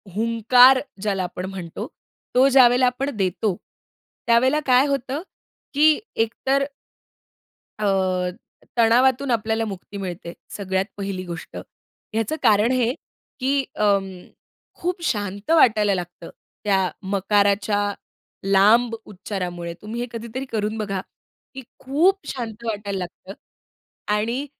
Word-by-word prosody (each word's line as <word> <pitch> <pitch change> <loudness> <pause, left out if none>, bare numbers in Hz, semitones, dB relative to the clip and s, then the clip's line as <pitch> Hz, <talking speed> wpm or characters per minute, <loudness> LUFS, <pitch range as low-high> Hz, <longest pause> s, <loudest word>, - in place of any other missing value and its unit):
हुंकार 230 +4 +5 0.2
ज्याला 195 -2 -1
आपण 180 0 -5
म्हणतो, 180 -4 -6 0.5
तो 255 +2 +6
ज्यावेळेला 255 -1 +6
आपण 265 +3 -1
देतो, 190 +1 0 0.7
त्यावेळेला 255 +5 +4
काय 255 +1 +5
होतं 275 +1 -2 0.5
की 305 +2 +5 0.2
एकतर 265 +5 +1 1.2
अ, 210 - -1 0.9
तणावातून 250 +3 +4
आपल्याला 225 0 0
मुक्ती 200 0 -7
मिळते 180 -3 -6 0.2
सगळ्यात 190 -1 -1
पहिली 195 -2 -4
गोष्ट. 175 0 -8 0.6
ह्याचं 225 +6 -1
कारण 215 +3 +4
हे, 250 -1 +1 0.5
की 275 +1 +1
अं, 200 -2 +2 0.7
खूप 355 0 -2
शांत 205 - -2
वाटायला 215 -10 +4
लागतं 175 -1 -7 0.3
त्या 190 -3 +2 0.2
मकाराच्या 205 +1 +2 0.6
लांब 215 +5 +4
उच्चारामुळे. 180 -4 -5
तुम्ही 225 +3 -5
हे 245 - -3
कधीतरी 235 +3 -5
करून 215 0 -1
बघा, 200 -3 -2 0.5
की 265 -1 -8 0.2
खूप 340 +9 +1
शांत 235 -3 -6
वाटायला 205 -3 -3
लागतं 185 +2 -8 0.8
आणि 230 +6 -1
220 Hz, 110 wpm, -22 LUFS, 195-255 Hz, 1.2 s, तो